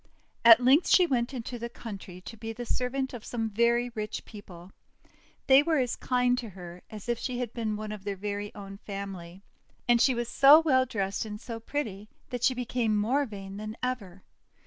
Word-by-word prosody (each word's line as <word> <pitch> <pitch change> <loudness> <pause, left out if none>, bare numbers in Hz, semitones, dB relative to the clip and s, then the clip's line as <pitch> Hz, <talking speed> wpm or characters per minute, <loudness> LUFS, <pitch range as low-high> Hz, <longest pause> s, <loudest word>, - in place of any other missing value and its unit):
At 230 -1 +10
length 275 +7 +5
she 365 - +6
went 245 -6 0
into 245 -1 -6
the 235 +1 -5
country 195 -6 -9
to 225 - -9
be 225 +1 -6
the 240 +2 -6
servant 260 +3 -2
of 235 -3 -7
some 225 -2 -3
very 235 +3 +2
rich 215 -1 -5
people. 190 -4 -12 0.7
They 270 +1 +7
were 320 +1 +1
as 250 -3 0
kind 250 -1 +1
to 230 - -6
her 180 -2 -10
as 215 -1 -9
if 240 -1 -1
she 255 -2 -3
had 245 -2 -4
been 220 -3 -2
one 215 0 -5
of 210 -2 -7
their 200 -1 -4 0.4
own 195 -1 -9
family. 195 -3 -7 0.4
And 240 -1 +4
she 260 0 +4
was 240 0 -2
so 280 +5 +8
well 260 -5 +3
dressed 195 -4 -2
and 210 -1 -7
so 230 -1 -7
pretty 215 -5 -4 0.2
that 245 -2 -3
she 260 - +3
became 240 -3 0
more 260 +7 +1
vain 195 -2 -8
than 215 +2 -6
ever. 200 -8 -4
230 Hz, 195 wpm, -28 LUFS, 205-250 Hz, 0.7 s, At